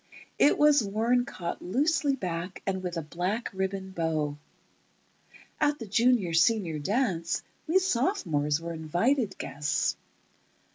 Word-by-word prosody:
It 290 - +5
was 295 -2 +5
worn 230 +5 +1
caught 180 -9 -5
loosely 285 - +1
back 180 -4 -5
and 190 -1 -1
with 180 -2 -4
a 165 - -2
black 180 +9 -3
ribbon 190 0 -3
bow. 160 -4 -1 1.2
At 295 0 +2
the 230 - -7
Junior 225 -4 +2
Senior 165 -2 +2
dance 185 - 0 0.2
we 330 +4 +4
sophomores 215 - +1
were 170 0 -5
invited 195 - 0
guests 145 0 -1
190 Hz, 125 wpm, -28 LUFS, 165-245 Hz, 1.2 s, It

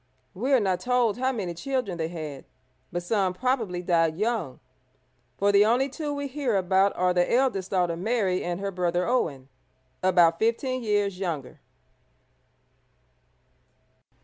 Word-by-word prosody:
We 250 +9 -2
are 265 - +6
not 190 -4 0
told 245 -3 +1
how 260 +1 +1
many 195 -8 -3
children 240 -3 -3
they 160 - -1
had, 155 -5 -7 0.5
but 175 0 -3
some 190 -1 0
probably 225 -7 -1
died 165 -2 +2
young, 210 - -2 0.8
for 200 +1 +3
the 200 0 +6
only 245 +5 +2
two 295 +2 -4
we 285 0 -3
hear 270 -4 -1
about 190 +1 +2
are 180 0 +2
the 175 0 +1
eldest 235 -7 +1
daughter 180 -3 +1
Mary 190 -1 0
and 175 0 -3
her 200 0 -3
brother 180 -1 0
Owen, 150 - -1 0.5
about 175 -3 +4
fifteen 255 +3 0
years 205 -4 0
younger. 160 -9 -4
195 Hz, 145 wpm, -26 LUFS, 175-240 Hz, 0.8 s, are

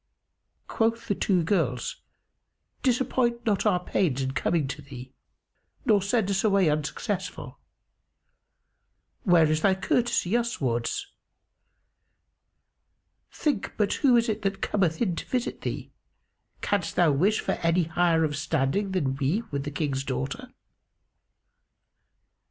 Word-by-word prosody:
Quoth 230 +1 0
the 205 - +2
two 185 -3 +1
girls, 155 - 0 0.8
"Disappoint 245 -2 +1
not 215 -1 +1
our 180 -4 +3
pains 155 -8 0
in 130 - -1
coming 145 +3 0
to 145 +2 -6
thee 130 -2 -10 0.7
nor 215 -5 +4
send 205 +1 +1
us 195 - 0
away 195 -6 +3
unsuccessful. 155 +6 -4 1.7
Where 175 -4 +6
is 155 0 +1
thy 190 +1 +4
courtesy 230 0 0
uswards? 180 - -1 2.3
Think 290 -10 -1
but 210 -2 +1
who 255 -4 +5
it 235 - +2
is 220 - -1
that 195 -1 -1
cometh 175 -7 0
in 185 -6 0
to - - -4
visit 250 -2 -2
thee: - - -5 0.7
canst 200 -4 -1
thou 175 -4 +4
wish 190 +10 +2
for - - -1
any 170 +1 +2
higher 165 0 +2
of 150 -2 0
standing 160 +7 0
than 135 -7 0
we 150 - 0
with 140 0 -3
the - - -2
King's 145 -2 -2
daughter?" 70 - -4
180 Hz, 125 wpm, -26 LUFS, 145-215 Hz, 2.3 s, Where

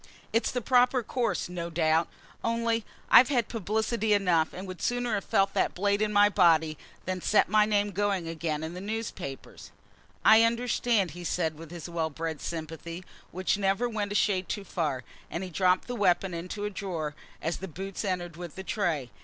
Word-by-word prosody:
It's 230 - +2
the 250 - -2
proper 250 0 +4
course, 240 +1 -1
no 170 -1 -5
doubt; 160 0 +2 0.4
only 230 0 0 0.3
I've 250 - +9
had 245 -6 +1
publicity 220 +1 0
enough, 180 -6 +2
and 185 +2 -7
would 185 -2 -8
sooner 245 -1 0
have 200 - 0
felt 195 0 +2
that - - +1
blade 200 +2 +1
in 215 -1 +1
my 205 0 +6
body 165 -6 +4 0.3
than 185 0 -3
set 210 - +3
my 210 +1 +4
name 205 -1 +1
going 195 -3 0
again 160 -2 -3
in 160 +1 -5
the 180 - -7
newspapers." 205 -9 -6 0.6
"I 220 +1 +8
understand," 230 -4 +2
he 175 +3 -9
said, 165 -2 0
with 165 +1 -11
his 170 -1 -7
well 165 -2 -1
bred 160 0 -4
sympathy, 165 +2 -6 0.2
which 185 +2 -1
never 195 +4 +1
went 210 -3 -3
a - - -2
shade 195 -3 +1
too 205 - -3
far; 150 -8 -2 0.3
and 170 - -4
he 185 - -6
dropped 185 +1 +2
the 245 - -3
weapon 190 -4 +2
into 180 +5 -4
a 210 - -2
drawer, 170 -6 -4 0.3
as 165 - -2
the 190 - -6
boots 190 +5 -6
entered 175 -4 -3
with 175 -2 -8
the 190 - -6
tray. 170 - -1
190 Hz, 190 wpm, -28 LUFS, 170-215 Hz, 0.6 s, I've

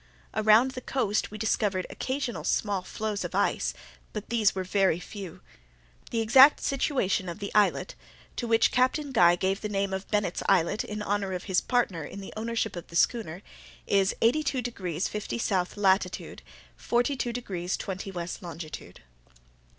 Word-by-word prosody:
Around 220 +4 +5
the 255 - -7
coast 215 -7 0
we 215 - -8
discovered 205 -3 0
occasional 260 -3 -3
small 200 -3 0
floes 210 +2 -4
of - - -5
ice—but 210 -1 -3
these 220 -5 +2
were 190 - -1
very 190 -2 +2
few. 185 -2 -9 0.7
The 230 - 0
exact 265 +6 +7
situation 250 - 0
of 170 - -6
the 200 -1 -6
islet 210 -1 +2 0.4
(to 240 - -2
which 225 0 +4
Captain 265 +3 +1
Guy 175 -8 +6
gave 190 +3 -1
the 210 - -3
name 195 -1 -1
of 190 +1 -4
Bennet's 205 -4 0
Islet, 185 +1 +3
in 210 0 -5
honour 200 -1 -1
of 180 - -4
his 190 -3 +1
partner 220 -10 0
in 195 - -8
the 195 - -9
ownership 225 -1 -2
of 175 - -7
the 170 - -11
schooner) 190 -2 +1 0.4
is 195 -1 +2
82 265 +1 +2
degrees 185 -8 -3
50' 210 -1 -4
S. 190 -6 -1
latitude, 190 -2 +1 0.4
42 245 +1 0
degrees 190 -7 -3
20' 190 0 -5
W. 175 -3 -5
longitude. 165 -3 -8
205 Hz, 160 wpm, -28 LUFS, 185-230 Hz, 0.7 s, exact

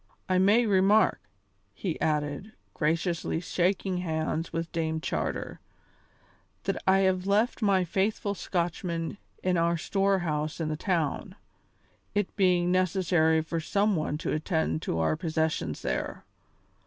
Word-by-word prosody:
I 185 -1 +2
may 210 +6 +5
remark," 205 +1 +4 0.5
he 175 -6 -4
added, 150 +7 -1 0.2
graciously 165 +1 0
shaking 185 +2 0
hands 160 -1 -2
with 165 0 -3
Dame 160 -1 -1
Charter, - - -3 1.0
"that - - -2
I 190 0 +5
left 200 +7 0
my 195 -3 +3
faithful 200 +3 0
Scotchman 170 -1 -2 0.2
in 180 -1 +2
our 170 0 +2
storehouse 175 -5 0
in 160 -2 -1
the 155 - -1
town, 175 +2 -1 0.8
it 205 -2 -1
being 180 -3 +3
necessary 175 -3 +2
for 165 +1 -3
some 200 +5 +1
one 155 -2 -1
to - - -3
attend 160 0 0
to 80 - -2
our 80 -1 +2
possessions 160 - -1
there. - - -3
175 Hz, 125 wpm, -28 LUFS, 160-195 Hz, 1.0 s, may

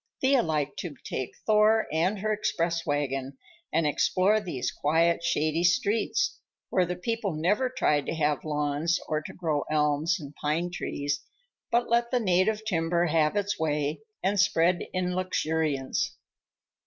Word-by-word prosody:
Thea 265 -1 +4
liked 150 -5 -2
to 165 -5 -5
take 130 - -4
Thor 215 +1 +4
and 180 +6 +1
her 215 +2 0
express 170 -5 -1
wagon 135 -2 -2 0.3
and 165 - +2
explore 185 +7 +2
these 170 -11 -3
quiet, 165 +3 +1
shady 160 0 +1
streets, 210 - +1 0.3
where 185 -2 +2
the 180 - -2
people 205 +1 -2
never 200 +11 +1
tried 150 - +1
to - - -2
have 150 -2 0
lawns 150 +2 0
or 155 -1 -1
to - - -8
grow 155 -5 -1
elms 155 +4 +1
and 145 -2 -9
pine 165 +4 0
trees, 145 -4 -3 0.5
but 235 +1 +2
let 235 0 +2
the 250 - +1
native 210 +2 +1
timber 170 -3 +1
have 155 +1 +2
its 205 0 -1
way 150 -2 -1 0.2
and 200 +1 +1
spread 175 -2 +3
in 180 -1 -1
luxuriance. 160 -6 -1
170 Hz, 150 wpm, -27 LUFS, 150-200 Hz, 0.5 s, Thea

